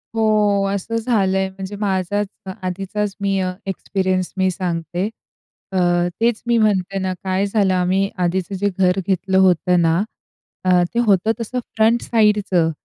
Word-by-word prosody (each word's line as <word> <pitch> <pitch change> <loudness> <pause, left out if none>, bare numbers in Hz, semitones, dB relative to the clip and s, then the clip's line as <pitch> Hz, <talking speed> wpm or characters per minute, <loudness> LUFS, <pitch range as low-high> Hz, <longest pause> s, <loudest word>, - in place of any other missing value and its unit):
हो, 210 -2 +2
असं 210 +4 -3
झालंय. 195 -5 +1
म्हणजे 190 +1 -7
माझाच 200 0 0 0.2
अ 190 - -5 0.2
आधीचाच 195 +2 -3
मी 195 -1 +1
अ, 185 -1 -1 0.2
एक्सपिरियन्स 185 -1 -1
मी 190 0 +2
सांगते. 175 +2 -3 0.6
अ, 190 - -2 0.4
तेच 230 -1 +2
मी 235 -1 +3
म्हणते 195 -3 +1
ना, 185 0 -1
काय 190 +1 0
झालं 200 -2 +1
आम्ही 185 +2 +1
आधीचं 185 +2 -1
जे 205 +2 0
घर 185 0 +3
घेतलं 190 0 +1
होतं 180 -1 +4
ना, 165 0 +3 0.7
अ, 180 -1 +4
ते 235 - +1
होतं 200 +2 +3
तसं 250 +3 -3 0.2
फ्रंट 225 +2 +3
साइडचं 205 -7 +2
190 Hz, 150 wpm, -20 LUFS, 185-210 Hz, 0.7 s, होतं